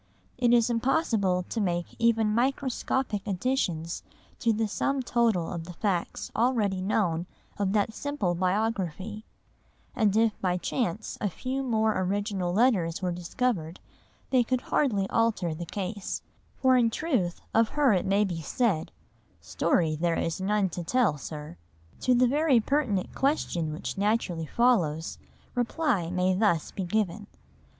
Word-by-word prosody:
It 240 Hz, -1 st, +3 dB
is 240 Hz, 0 st, +4 dB
impossible 230 Hz, -, +1 dB
to 225 Hz, -, -2 dB
make 175 Hz, -3 st, -2 dB
even 225 Hz, -2 st, +3 dB
microscopic 255 Hz, -2 st, 0 dB
additions 180 Hz, -6 st, -1 dB, 0.4 s
to 230 Hz, -, +2 dB
the 220 Hz, 0 st, 0 dB
sum 275 Hz, +6 st, -1 dB
total 230 Hz, -9 st, +1 dB
of 165 Hz, -2 st, -5 dB
the 175 Hz, -, -8 dB
facts 180 Hz, -2 st, -2 dB
already 220 Hz, -6 st, +1 dB
known 180 Hz, -4 st, 0 dB, 0.3 s
of 195 Hz, -1 st, +1 dB
that 215 Hz, +1 st, +1 dB
simple 220 Hz, -6 st, -1 dB
biography, 195 Hz, +2 st, -1 dB, 0.7 s
and 215 Hz, -3 st, +2 dB
if 225 Hz, -1 st, +2 dB
by 180 Hz, -1 st, +1 dB
chance 210 Hz, +1 st, -2 dB
a 205 Hz, -, +1 dB
few 260 Hz, +8 st, -3 dB
more 220 Hz, -4 st, +1 dB
original 195 Hz, -1 st, -1 dB
letters 195 Hz, -5 st, +2 dB
were 180 Hz, -, 0 dB
discovered 175 Hz, -1 st, -2 dB, 0.5 s
they 255 Hz, -2 st, +5 dB
could 255 Hz, +1 st, -1 dB
hardly 205 Hz, -9 st, +1 dB
alter 220 Hz, -7 st, +1 dB
the 170 Hz, +2 st, -6 dB
case, 200 Hz, +2 st, -4 dB, 0.3 s
for 260 Hz, -1 st, +4 dB
in 240 Hz, -2 st, +4 dB
truth 225 Hz, -, -1 dB
of 225 Hz, 0 st, +4 dB
her 285 Hz, -5 st, +3 dB
it 185 Hz, -, 0 dB
may 200 Hz, +2 st, +3 dB
be 175 Hz, -5 st, -3 dB
said, 190 Hz, -, 0 dB, 0.5 s
"Story 160 Hz, -3 st, +1 dB
there 165 Hz, +2 st, 0 dB
is 165 Hz, +3 st, -2 dB
none 200 Hz, 0 st, +1 dB
to 175 Hz, +1 st, -5 dB
tell, 200 Hz, -, +2 dB
sir." 150 Hz, -, -7 dB, 0.4 s
To 255 Hz, -, +3 dB
the 250 Hz, +1 st, +5 dB
very 285 Hz, -1 st, +3 dB
pertinent 225 Hz, -6 st, 0 dB
question 180 Hz, -, 0 dB
which 160 Hz, +5 st, -5 dB
naturally 200 Hz, -6 st, 0 dB
follows, 175 Hz, -11 st, +1 dB, 0.3 s
reply 245 Hz, -, 0 dB
may 180 Hz, +1 st, +1 dB
thus 185 Hz, -5 st, +1 dB
be 190 Hz, -, -4 dB
given. 205 Hz, +1 st, -1 dB
205 Hz, 145 wpm, -28 LUFS, 180-240 Hz, 0.7 s, they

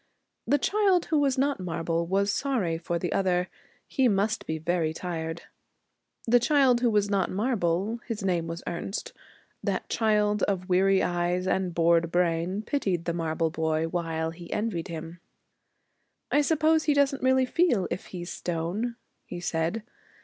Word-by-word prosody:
The 290 Hz, -, +4 dB
child 390 Hz, +2 st, +2 dB
who 310 Hz, -, +1 dB
was 275 Hz, -2 st, +2 dB
not 275 Hz, -1 st, +1 dB
marble 170 Hz, -1 st, -2 dB
was 200 Hz, +3 st, +1 dB
sorry 210 Hz, -14 st, -1 dB
for 170 Hz, 0 st, -2 dB
the 170 Hz, 0 st, -2 dB
other. 180 Hz, -2 st, +1 dB, 0.4 s
He 265 Hz, -2 st, +2 dB
must 215 Hz, +2 st, 0 dB
be 160 Hz, -, -2 dB
very 160 Hz, 0 st, 0 dB
tired. 165 Hz, -2 st, -4 dB, 0.8 s
The 245 Hz, +1 st, +5 dB
child 260 Hz, -2 st, +3 dB
who 245 Hz, -, +3 dB
was 210 Hz, -2 st, +2 dB
not 195 Hz, -2 st, +1 dB
marble, 205 Hz, -1 st, 0 dB
his 225 Hz, -5 st, -4 dB
name 175 Hz, -3 st, 0 dB
was 165 Hz, 0 st, -6 dB
Ernest, 175 Hz, +3 st, -4 dB, 0.5 s
that -, -, -2 dB
child 210 Hz, -2 st, +2 dB
of 185 Hz, -2 st, 0 dB
weary 190 Hz, +1 st, +3 dB
eyes 175 Hz, +1 st, 0 dB
and 185 Hz, -2 st, 0 dB
bored 170 Hz, 0 st, +3 dB
brain, 175 Hz, +3 st, 0 dB
pitied 195 Hz, -, -1 dB
the 170 Hz, -, -1 dB
marble 165 Hz, -1 st, -1 dB
boy 160 Hz, 0 st, 0 dB
while 165 Hz, -2 st, -2 dB
he 170 Hz, +1 st, -11 dB
envied 210 Hz, -6 st, -2 dB
him. 165 Hz, +1 st, -7 dB, 1.1 s
'I 295 Hz, -, +4 dB
suppose 315 Hz, +1 st, +2 dB
he 295 Hz, -, +3 dB
doesn't 280 Hz, -1 st, +2 dB
really 260 Hz, 0 st, +3 dB
feel, 250 Hz, -, +2 dB
if -, -, -4 dB
he's 175 Hz, -1 st, -7 dB
stone,' 180 Hz, +8 st, -3 dB, 0.3 s
he 175 Hz, -, -6 dB
said. 170 Hz, +5 st, -1 dB
185 Hz, 155 wpm, -27 LUFS, 170-235 Hz, 1.1 s, The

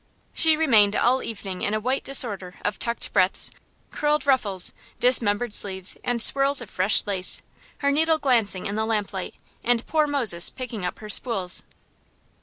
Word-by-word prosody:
She 320 Hz, -1 st, +3 dB
remained 220 Hz, -10 st, +3 dB
all 255 Hz, +2 st, +1 dB
evening 195 Hz, -4 st, -7 dB
in 205 Hz, -, -2 dB
a -, -, -1 dB
white 255 Hz, +5 st, -2 dB
disorder 205 Hz, -9 st, +2 dB
of 205 Hz, -2 st, -3 dB
tucked 235 Hz, 0 st, -4 dB
breadths, 185 Hz, +1 st, +2 dB, 0.4 s
curled 300 Hz, -1 st, -1 dB
ruffles, 210 Hz, -9 st, +1 dB, 0.3 s
dismembered 235 Hz, -2 st, +2 dB
sleeves, 190 Hz, -2 st, 0 dB
and 245 Hz, -1 st, -2 dB
swirls 275 Hz, +4 st, +3 dB
of 240 Hz, -5 st, -7 dB
fresh 190 Hz, +3 st, +4 dB
lace; 190 Hz, -2 st, -1 dB, 0.3 s
her 280 Hz, -1 st, 0 dB
needle 320 Hz, +2 st, +1 dB
glancing 235 Hz, -10 st, 0 dB
in 200 Hz, -, -4 dB
the 220 Hz, 0 st, -1 dB
lamplight, 205 Hz, -4 st, -4 dB, 0.3 s
and 240 Hz, -1 st, 0 dB
poor 310 Hz, -1 st, 0 dB
Moses 235 Hz, -12 st, +2 dB
picking 245 Hz, -6 st, -8 dB
up 180 Hz, -, -4 dB
her 215 Hz, -, -11 dB
spools. 195 Hz, -8 st, +2 dB
225 Hz, 160 wpm, -23 LUFS, 200-265 Hz, 0.4 s, fresh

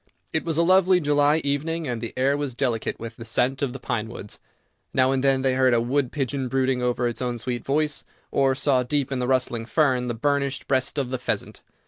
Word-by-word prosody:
It 160 Hz, -, 0 dB
was 165 Hz, -2 st, -2 dB
a 170 Hz, -, +4 dB
lovely 185 Hz, +1 st, +5 dB
July 145 Hz, 0 st, +3 dB
evening, 155 Hz, +3 st, -1 dB
and 120 Hz, -3 st, -3 dB
the 115 Hz, -, -4 dB
air 135 Hz, +2 st, +2 dB
was 145 Hz, -4 st, -3 dB
delicate 120 Hz, -4 st, -1 dB
with 115 Hz, 0 st, -7 dB
the 115 Hz, -, -8 dB
scent 125 Hz, +4 st, 0 dB
of 140 Hz, -3 st, 0 dB
the 135 Hz, -, -6 dB
pinewoods. 110 Hz, -3 st, -5 dB, 0.6 s
Now 130 Hz, 0 st, +4 dB
and 135 Hz, 0 st, 0 dB
then 135 Hz, -1 st, +3 dB
they 130 Hz, -1 st, +2 dB
heard 130 Hz, -1 st, +3 dB
a -, -, +3 dB
wood 125 Hz, +2 st, 0 dB
pigeon 135 Hz, -2 st, -2 dB
brooding 130 Hz, 0 st, 0 dB
over 125 Hz, 0 st, 0 dB
its 120 Hz, -, -4 dB
own 125 Hz, -1 st, -2 dB
sweet 120 Hz, +1 st, -4 dB
voice, 150 Hz, +1 st, 0 dB, 0.3 s
or 135 Hz, -1 st, +2 dB
saw, 135 Hz, -1 st, +2 dB
deep 140 Hz, +2 st, -1 dB
in 130 Hz, -, -1 dB
the 125 Hz, -, -1 dB
rustling 120 Hz, -3 st, 0 dB
fern, 125 Hz, -1 st, +2 dB
the 120 Hz, -, -2 dB
burnished 140 Hz, +1 st, -1 dB
breast 130 Hz, +2 st, 0 dB
of 135 Hz, -3 st, -1 dB
the 130 Hz, -, -2 dB
pheasant. -, -, -3 dB
130 Hz, 220 wpm, -24 LUFS, 125-145 Hz, 0.6 s, lovely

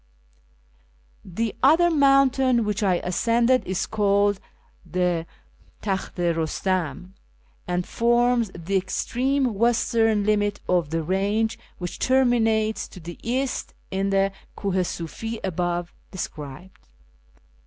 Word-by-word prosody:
The 215 Hz, +4 st, -3 dB
other 325 Hz, +6 st, +5 dB
mountain 275 Hz, -4 st, +4 dB
which 210 Hz, 0 st, -1 dB
I 190 Hz, -3 st, +3 dB
ascended 235 Hz, +7 st, +2 dB
is 185 Hz, 0 st, -1 dB
called 205 Hz, -1 st, +2 dB, 0.4 s
the 180 Hz, -2 st, -1 dB, 0.6 s
Takht 195 Hz, -2 st, -3 dB
i 175 Hz, -1 st, +2 dB
Rustam, 180 Hz, +2 st, -2 dB, 0.5 s
and 180 Hz, 0 st, -1 dB
forms 240 Hz, -1 st, +2 dB
the 185 Hz, +4 st, -1 dB
extreme 250 Hz, +7 st, 0 dB
western 225 Hz, -1 st, +2 dB
limit 205 Hz, -1 st, +1 dB
of 175 Hz, -4 st, +1 dB
the 165 Hz, +1 st, -1 dB
range 200 Hz, +6 st, 0 dB, 0.2 s
which 175 Hz, -1 st, -6 dB
terminates 225 Hz, -4 st, +2 dB
to 185 Hz, -, -12 dB
the 170 Hz, 0 st, -9 dB
east 255 Hz, +3 st, -2 dB, 0.2 s
in 195 Hz, +1 st, 0 dB
the 195 Hz, 0 st, +2 dB, 0.3 s
Kuh 195 Hz, -2 st, -2 dB
i -, -, +3 dB
Sufi 200 Hz, +6 st, -4 dB
above 175 Hz, -1 st, -2 dB, 0.2 s
described. 160 Hz, -1 st, -8 dB
205 Hz, 110 wpm, -24 LUFS, 180-235 Hz, 0.6 s, other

